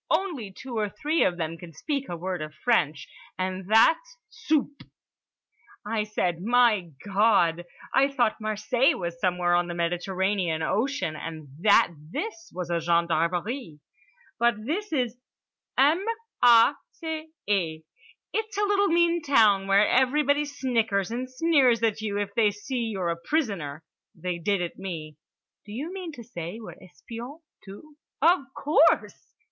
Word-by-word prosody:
Only 300 - -1
two 235 +3 -6
or 210 -1 0
three 300 - 0
of 175 - +1
them 165 -1 -4
can 170 -1 -11
speak 280 - -3
a 175 - -4
word 180 0 -4
of 155 0 -7
French, 155 - +1 0.3
and 185 0 -3
that's 330 - +4
soupe!" 290 -2 -1 1.0
I 215 +1 -1
said, 180 -5 -1
"My 225 -4 +3 0.2
God, 195 -5 +3 0.3
I 275 - +5
thought 245 -6 0
Marseilles 215 +5 +1
was 170 -1 -5
somewhere 180 -1 +1
on 175 0 +2
the 175 - -5
Mediterranean 175 0 -1
Ocean, 225 - -1
and 155 -2 -7
that 200 -1 +5
this 330 - -6
was 180 -1 -5
a 170 - +1
gendarmerie." 170 - 0 0.6
"But 235 -2 +1
this 400 - -3
is 250 -5 -1 0.6
M 305 +7 +4 0.4
a 235 +2 +7 0.2
c 320 -1 -6 0.2
é. 165 -6 0 0.5
It's 435 -2 -3
a 415 - +1
little 405 0 +3
mean 340 -1 +3
town, 215 -9 +4
where 200 +2 +5
everybody 285 +3 +2
snickers 230 -8 -1
and 250 +2 -4
sneers 255 -5 +3
at 220 -1 +1
you 205 -2 -2
if 205 -1 -3
they 215 -1 +3
see 230 +4 -4
you're 190 -6 -2
a 170 - -1
prisoner. 185 - -2 0.3
They 180 -1 -4
did 195 +1 0
at 175 - -6
me." 160 -6 -6 0.5
"Do 205 - -12
you 290 - -5
mean 370 -4 -6
to 240 - -10
say 195 -3 -7
we're 220 - -9
espions 235 - -10 0.2
too?" 250 +10 -13 0.2
"Of 345 +5 +5 0.2
course!" 305 +2 +2
215 Hz, 150 wpm, -26 LUFS, 175-275 Hz, 1.0 s, a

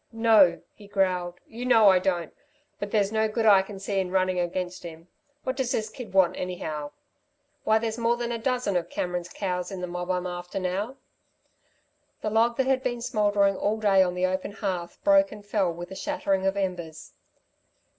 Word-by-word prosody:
"No," 220 -7 +4
he 205 - -15
growled, 185 -3 0
"you 235 +2 -8
know 225 -5 +6
I 185 -1 +5
don't, 175 -3 -1 0.5
but 205 - -4
there's 205 -2 +1
no 220 0 +2
good 220 +1 -1
I 200 -3 +7
can 195 +1 -9
see 195 0 -2
in 185 -1 -1
running 185 -1 +1
against 180 +1 -3
him. 165 0 -10 0.3
What 260 - -2
does 255 -2 -1
this 215 0 -2
kid 235 -5 -9
want 190 -2 +4
anyhow? 155 -5 -4 0.8
Why, 220 - +4
there's 225 +1 -3
more 235 +1 +2
than 240 0 -3
a 230 - -2
dozen 245 -4 -1
of 175 -1 -1
Cameron's 180 -1 -3
cows 180 -2 -3
in 190 - -5
the 180 - -3
mob 180 0 -5
I'm 180 0 0
after 180 +1 -5
now." 195 +8 -3 1.2
The 215 - -2
log 230 +2 +2
that 265 - +2
had 265 0 +2
been 240 -2 -3
smouldering 205 -3 +2
all 205 +3 0
day 200 -3 +4
on 180 -1 +1
the 180 +1 +1
open 185 +2 -2
hearth 185 -5 -4
broke 295 0 +5
and 205 - -11
fell 205 -4 +1
with 175 +2 -8
a - - -6
shattering 195 0 -1
of 195 +1 0
embers. 175 -5 -4
195 Hz, 195 wpm, -26 LUFS, 180-220 Hz, 1.2 s, I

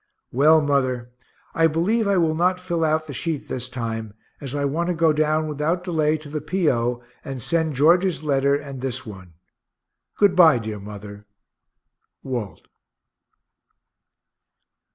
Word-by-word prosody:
Well, 155 +5 +5
mother, 130 -4 0 0.4
I 165 0 +4
believe 195 +8 +1
I 200 -1 +2
will 165 -3 +2
not 180 +3 +1
fill 175 -2 -2
out 155 0 +1
the 145 - -8
sheet 155 +2 -3
this 125 0 -4
time, 115 -4 -5 0.2
as 140 -1 -5
I 140 0 0
want 160 +5 -1
to 180 - 0
go 165 -1 +3
down 155 +1 +1
without 155 +4 -1
delay 160 -3 +1
to 155 0 -12
the 150 +1 -4
P. 160 +2 +1
O. 120 0 -2 0.2
and 135 -1 -6
send 160 +4 -1
George's 170 +5 +3
letter 140 -1 +2
and 140 -3 -6
this 130 -1 -3
one. 95 -5 -11 0.8
Good 200 -3 +4
bye, 165 -7 +7
dear 110 -2 -5
mother. 105 0 -10 1.0
WALT. 120 -7 -5
150 Hz, 150 wpm, -23 LUFS, 125-165 Hz, 1.0 s, bye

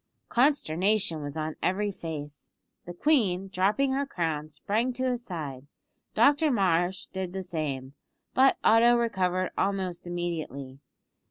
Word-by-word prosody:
Consternation 205 - +2
was 145 +1 -6
on 155 0 -3
every 205 +3 0
face. 150 -5 -7 0.4
The 175 - -7
queen, 195 - +2
dropping 200 +8 +1
her 275 +1 0
crown, 160 - -2
sprang 220 - -1
to 255 - -4
his 250 -2 -1
side, 145 - -6 0.5
Dr 295 +2 +4
Marsh 185 - +1
did 190 -2 -5
the 190 0 -4
same, 145 -7 -4 0.4
but 265 +1 +5
Otto 235 +2 +6
recovered 185 -6 0
almost 190 -3 -1
immediately. 155 -7 -4
185 Hz, 125 wpm, -28 LUFS, 160-225 Hz, 0.5 s, Otto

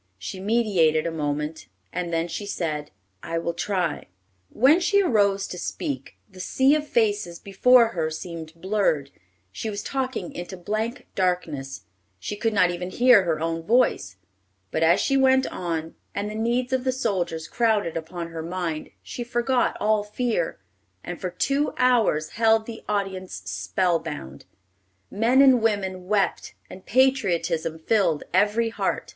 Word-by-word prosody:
She 185 - -7
meditated 190 -7 +2
a 170 - -1
moment, 150 0 -3 0.3
and 175 -1 -3
then 165 0 0
she 190 +5 -5
said, 155 -6 -3 0.3
"I 165 - -3
will 170 0 -2
try." 180 -2 -2 0.4
When 275 +9 +4
she 400 +3 +3
arose 200 - +2
to 180 - -6
speak, 135 -5 -4
the 190 -2 -16
sea 265 +9 +3
of 300 0 0
faces 205 -8 0
before 230 +5 +4
her 165 -7 -2
seemed 160 0 -7
blurred. 185 -8 0 0.4
She 220 - -4
was 205 -1 -4
talking 260 -8 -3
into 175 +2 -7
blank 215 +8 -3
darkness. 160 -8 -2 0.4
She 150 - -5
could 225 +2 0
not 180 -4 +3
even 180 +1 -4
hear 240 -2 +5
her 160 -3 0
own 165 +1 -2
voice. 215 - +2 0.6
But 160 - -1
as 170 +3 +5
she 275 - +2
went 265 0 +4
on, 165 -2 -4 0.2
and 205 +1 -2
the - - -6
needs 240 +3 -1
of 260 -1 +1
the 260 - +1
soldiers 175 -10 -2
crowded 220 -8 +1
upon 170 +1 -5
her 165 -1 -6
mind, 170 -2 -4
she 245 - -6
forgot 240 +1 0
all 215 0 +2
fear, 210 -4 -2 0.5
and 175 - -7
for 185 - -2
two 275 +11 0
hours 230 -12 +3
held 225 +1 +3
the 225 -1 -8
audience 190 - -3
spell 95 - 0
bound. 150 - -8 0.7
Men 240 +6 +4
and 260 -3 +6
women 190 -4 -1
wept, 205 -1 0 0.2
and 185 - -12
patriotism 180 -11 +1
filled 165 -2 +1
every 220 +3 +3
heart. 225 - -2
190 Hz, 155 wpm, -24 LUFS, 165-230 Hz, 0.7 s, and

